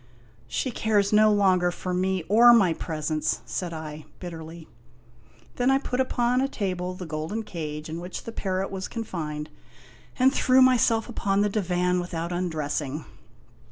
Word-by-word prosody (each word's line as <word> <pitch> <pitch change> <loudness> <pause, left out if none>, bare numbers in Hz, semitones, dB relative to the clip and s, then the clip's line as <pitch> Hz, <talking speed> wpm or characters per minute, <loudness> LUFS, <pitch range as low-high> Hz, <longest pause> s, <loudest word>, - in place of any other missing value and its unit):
" 115 -1 -31
She 260 - -2
cares 210 -3 +1
no 215 0 +6
longer 185 -3 +3
for 180 +1 -4
me 185 0 0
or 235 +4 +7
my 195 -8 +5
presents! 155 -1 -2
" - - -30
said 180 -2 -4
I, 155 -1 -7
bitterly. 165 -2 -8 0.9
Then 245 +1 +2
I 270 - +5
put 260 -2 -3
upon 250 -1 +1
a 270 - +1
table 185 -7 -3
the 180 - -7
golden 160 +8 -4
cage 155 -6 -6
in 160 +1 -5
which 180 +1 -6
the 230 - -6
parrot 190 -3 -2
was 190 -1 -4
confined, 155 -9 -5 0.7
and 265 +1 +4
threw 260 -2 +4
myself 245 -3 +4
upon 200 -4 0
the 210 - +2
divan 180 -3 0
without 170 -1 -4
undressing. 155 -4 -2
185 Hz, 160 wpm, -26 LUFS, 160-220 Hz, 0.9 s, or